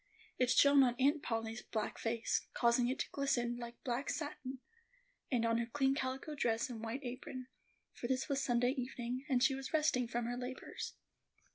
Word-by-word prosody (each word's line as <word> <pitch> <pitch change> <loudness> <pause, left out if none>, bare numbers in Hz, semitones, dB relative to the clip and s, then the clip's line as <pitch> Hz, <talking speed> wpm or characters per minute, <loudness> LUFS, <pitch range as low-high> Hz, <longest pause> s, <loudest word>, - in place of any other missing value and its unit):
It 250 -1 +3
shone 280 +2 +7
on 245 -2 +4
Aunt 285 +3 +3
Polly's 225 -3 -2
black 220 - -3
face, 230 0 0
causing 240 +1 +4
it 260 - -1
to - - -3
glisten 245 -4 0
like 235 0 -8
black 250 +2 -1
satin, 275 -4 -4 0.7
and 235 -3 +2
on 230 0 +2
her 235 - -1
clean 270 +2 +2
calico 270 +2 -3
dress 240 -3 0
and 225 -2 -6
white 235 +5 -3
apron; 255 +1 -6 0.4
for 240 - -4
this 260 +1 0
was 275 -2 0
Sunday 245 0 +3
evening, 255 0 -4
and 255 -2 +3
she 270 - +5
was 270 +2 -5
resting 300 -6 +3
from 240 0 -1
her 245 +1 -2
labors. 250 +1 -5
250 Hz, 180 wpm, -36 LUFS, 235-270 Hz, 0.7 s, shone